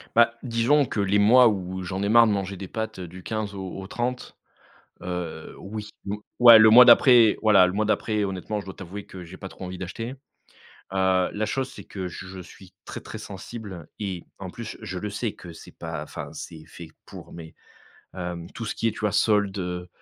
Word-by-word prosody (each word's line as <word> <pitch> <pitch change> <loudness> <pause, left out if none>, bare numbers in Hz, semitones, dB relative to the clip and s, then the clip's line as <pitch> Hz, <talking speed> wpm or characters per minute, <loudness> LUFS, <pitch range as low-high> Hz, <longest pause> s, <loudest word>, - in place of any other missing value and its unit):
Bah 115 0 +5
disons 125 +4 +2
que 105 - -4
les 100 +1 +2
mois 120 +5 +7
où 95 -3 -2
j'en 95 +2 -4
ai 100 - 0
marre 115 0 +7
de - - +2
manger 100 -1 -2
des 95 0 -7
pâtes 110 -1 -5
du 90 +1 -9
15 110 -2 -4
au 95 -1 -6
au 95 - -8
30, 125 +3 -4 0.7
heu, 90 -3 -5
oui 105 +1 -7 0.2
ou 105 +1 -4 0.2
ouais 115 -2 +10
le 110 0 +8
mois 125 +3 +10
d'après 120 -2 +7
voilà 100 -4 +6
le 90 - -2
mois 105 +3 0
d'après 110 0 0
honnêtement, 100 +2 -3
je - - -11
dois 95 - -8
t'avouer 95 +2 -8
que 90 -2 -10
j'ai 90 +3 -11
pas 95 - -8
trop 95 - -10
envie 90 0 -7
d'acheter, 115 +6 -5 0.8
heu, 95 -1 +2
la 110 +1 -2
chose, 130 +2 -2
c'est - - -11
que 95 -2 -6
je 95 +1 -9
suis 90 +1 -14
très, - - -7
très - - -8
sensible 100 -3 -9
et 95 -4 -4 0.2
en 95 -2 -6
plus 115 +3 -8
je 90 - -6
le 105 +3 -4
sais 105 +1 -3
que 85 -2 -12
c'est 80 - -14
pas 80 -3 -5
enfin 75 - -8
c'est 80 -2 -9
fait 85 -2 -11 0.2
pour, - - -12
mais 80 -1 -10 0.6
hem, 90 -2 -5
tout 115 -1 -6
ce - - -4
qui 115 - 0
est, - - +1
tu - - -11
vois? 105 -1 0
Soldes, 105 -2 +2
heu 90 -1 -4
100 Hz, 215 wpm, -25 LUFS, 90-110 Hz, 0.8 s, ouais